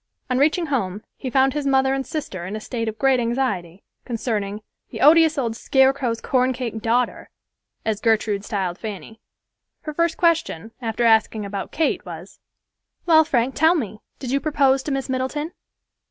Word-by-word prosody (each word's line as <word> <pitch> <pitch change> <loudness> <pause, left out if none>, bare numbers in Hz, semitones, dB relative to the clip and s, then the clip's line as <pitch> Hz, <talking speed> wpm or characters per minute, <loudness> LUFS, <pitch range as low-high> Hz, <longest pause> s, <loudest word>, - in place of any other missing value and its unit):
On 255 - +2
reaching 315 +5 +2
home 215 - -2
he 260 - -5
found 265 +1 +3
his 295 -2 -2
mother 265 0 +3
and 270 0 -1
sister 200 - -5
in 200 - -5
a - - -4
state 230 +1 -4
of 220 - -8
great 270 -1 +3
anxiety 230 -8 -2 0.2
concerning 215 -3 -3 0.3
"the - - -7
odious 320 +1 +6
old 230 -4 -1
scarecrow's 265 -2 +2
corncake 250 -3 -1
daughter," 235 +2 0 0.6
as 215 -2 -1
Gertrude 215 -3 +1
styled 190 -4 -3
Fanny. 215 0 -8 0.6
Her 305 - -6
first 335 +1 0
question, 325 - +1
after 225 0 -2
asking 220 -2 +3
about 200 -1 -5
Kate, 320 - 0
was, - - -10 0.7
"Well, 320 -2 +6
Frank, 260 -3 0
tell 320 +3 +4
me, 215 - -3 0.2
did 255 -2 -5
you 275 - +2
propose 275 -2 +2
to 290 - -4
Miss 270 -1 -2
Middleton?" 265 +5 -2
250 Hz, 165 wpm, -22 LUFS, 220-280 Hz, 0.7 s, odious